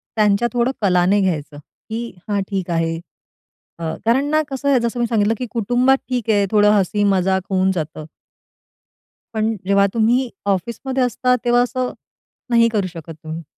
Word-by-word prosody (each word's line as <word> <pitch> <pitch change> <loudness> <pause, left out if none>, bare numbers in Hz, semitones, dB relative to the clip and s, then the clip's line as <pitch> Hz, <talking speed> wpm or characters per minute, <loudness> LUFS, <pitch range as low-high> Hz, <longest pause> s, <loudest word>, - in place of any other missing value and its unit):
त्यांच्या 215 +1 +3
थोडं 245 +1 +1
कलाने 185 +1 +3
घ्यायचं, 150 -5 -2 0.3
की 230 +1 -4 0.2
हां, 200 -1 +1
ठीक 190 -3 -3
आहे 165 0 0 0.8
अ, - - -6 0.2
कारण 255 +5 +3
ना 310 0 +3
कसं 270 +1 -4
आहे, 265 -3 +4
जसं 235 +1 -2
मी 240 - +2
सांगितलं, 220 -1 +2
की 250 - -3
कुटुंबात 245 +4 +2
ठीक 245 -3 -2
आहे, 205 -2 +3
थोडं 210 -1 +5
हसी 205 0 +1
मजाक 190 -1 +2
होऊन 190 0 +2
जातं. 155 -2 -4 1.3
पण 220 0 0
जेव्हा 200 0 +4
तुम्ही 235 +3 +2 0.2
ऑफिसमध्ये 235 +7 -1
असता. 250 +1 +1
तेव्हा 240 0 +4
असं, 250 +1 -1 0.6
नाही 230 -1 +5
करू 200 -3 +1
शकत 165 -2 -9
तुम्ही. 160 +1 -6
210 Hz, 160 wpm, -20 LUFS, 190-240 Hz, 1.3 s, थोडं